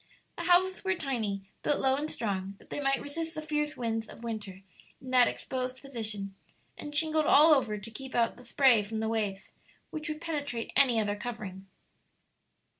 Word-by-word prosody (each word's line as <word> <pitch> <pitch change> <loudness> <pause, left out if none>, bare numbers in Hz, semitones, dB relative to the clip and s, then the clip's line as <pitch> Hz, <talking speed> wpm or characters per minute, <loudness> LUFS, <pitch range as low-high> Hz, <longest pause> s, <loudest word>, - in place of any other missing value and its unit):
The 340 - -5
houses 365 +1 +3
were 380 -1 +1
tiny, 220 - -2 0.2
built 295 - +1
low 265 0 +3
and 295 +3 -2
strong, 195 -5 -3
that - - -21
they - - -3
might 275 -1 +1
resist 325 +3 -4
the 310 - -3
fierce 300 -1 -1
winds 225 -2 -2
of 230 - -12
winter 205 -5 -6 0.4
in 260 -1 -9
that 250 -1 +6
exposed 255 0 -3
position, 220 -7 -4 0.4
and 295 0 -8
shingled 310 -1 +3
all 310 +2 +8
over 230 -7 +1
to 210 +2 -8
keep 265 +4 -8
out 230 -1 +2
the 245 - -14
spray 245 -2 +5
from 220 +2 -4
the 220 - -1
waves, 205 -3 -2 0.4
which 310 +1 -5
would 305 0 -4
penetrate 290 -8 -4
any 245 -5 +6
other 205 -1 0
covering. 210 -4 -6
250 Hz, 185 wpm, -30 LUFS, 215-295 Hz, 0.4 s, all